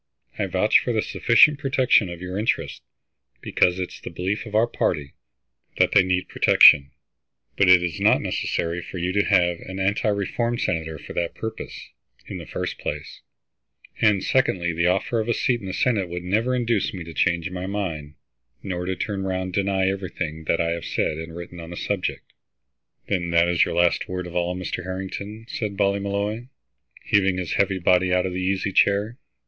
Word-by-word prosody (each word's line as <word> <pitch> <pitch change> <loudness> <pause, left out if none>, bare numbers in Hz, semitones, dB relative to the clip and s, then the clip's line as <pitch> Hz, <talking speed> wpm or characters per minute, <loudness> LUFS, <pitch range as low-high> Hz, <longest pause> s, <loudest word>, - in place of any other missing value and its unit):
I - - 0
vouch - - +3
for - - -2
the - - +1
sufficient 150 0 +4
protection 130 - +3
of 85 +1 -8
your 90 0 -5
interests, 100 - -1 0.6
because 90 0 +1
it 90 -1 -3
is - - -12
the - - -7
belief 95 +6 -3
of 105 - -7
our 110 +2 +5
party 75 -10 -2 0.6
that - - +3
they 100 - +6
need 90 0 0
protection. 70 -1 +6 0.7
But 100 -2 +3
it 90 -1 +7
is 85 -3 -3
not - - +4
necessary 85 +1 -2
for 95 - -8
you 90 +1 -1
to 100 0 +3
have 85 -3 +2
an 95 - -8
anti 100 +3 0
reform 110 +4 -1
senator 80 -6 -2
for - - -10
that 85 -1 -2
purpose, 110 0 -6 0.5
in - - -7
the - - -10
first - - -4
place; - - -6 0.8
and 105 -3 +3
secondly, 90 -10 +1
the 85 +2 +1
offer 95 +5 +1
of 110 +1 -2
a 120 - +2
seat 120 -2 +1
in 95 - -7
the - - -3
Senate 100 -4 0
would 90 0 -5
never 110 +8 0
induce 115 -6 0
me 90 - -6
to 85 0 -10
change 85 +1 0
my 90 0 -5
mind, 80 -8 -4 0.5
nor 90 -2 -4
to 95 0 -2
turn 100 +1 -3
round 95 -1 -2
and 95 0 -6
deny 95 -1 +1
everything 90 -5 -4
that 85 - +1
I 85 0 +1
have 85 0 -4
said 75 - -1
and 80 0 -8
written 85 0 -9
on 85 -1 -9
the 85 - -8
subject." 100 -3 -2 0.8
"Then 90 -4 -1
that 85 0 +3
is 85 -1 +3
your - - -4
last 85 0 +2
word 90 -1 -4
of 90 0 -9
all, 90 0 0
Mr. 90 0 -4
Harrington?" 95 +4 -6
said 105 -4 -4
Ballymolloy, 100 +3 -1 0.6
heaving 95 -2 +2
his 90 -3 -3
heavy 100 -1 +1
body 90 +1 +2
out 90 0 +2
of 95 - -3
the 90 - -3
easy 95 +1 -1
chair. 100 +5 +2
95 Hz, 195 wpm, -23 LUFS, 85-100 Hz, 0.8 s, it